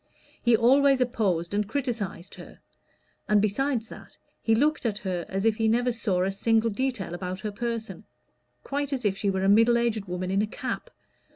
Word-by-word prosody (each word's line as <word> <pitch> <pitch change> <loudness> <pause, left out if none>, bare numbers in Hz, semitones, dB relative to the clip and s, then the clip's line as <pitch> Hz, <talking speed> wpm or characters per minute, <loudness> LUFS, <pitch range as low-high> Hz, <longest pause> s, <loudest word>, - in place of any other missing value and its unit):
He 235 -2 +4
always 270 +3 +4
opposed 200 -9 0
and 205 0 0
criticised 225 -10 -3
her; - - -12 0.7
and 210 0 +5
besides 230 +4 0
that, - - -13 0.2
he 225 - +2
looked 300 +6 +1
at 220 -4 -1
her 185 -4 -4
as 195 +2 -2
if 220 -1 +3
he 225 -1 +1
never 245 +3 +2
saw 200 -6 0
a 190 - 0
single 225 +3 +1
detail 230 -6 -2
about 180 +1 -5
her 210 - -3
person 230 +1 -4 0.6
quite 285 0 -3
as 255 -4 -3
if 195 -2 +2
she 200 +1 -1
were 190 -1 -1
a - - +2
middle 230 +4 +5
aged 230 -3 0
woman 180 0 -4
in 195 +1 +2
a 215 - 0
cap. 360 - -5
220 Hz, 190 wpm, -26 LUFS, 195-240 Hz, 0.7 s, and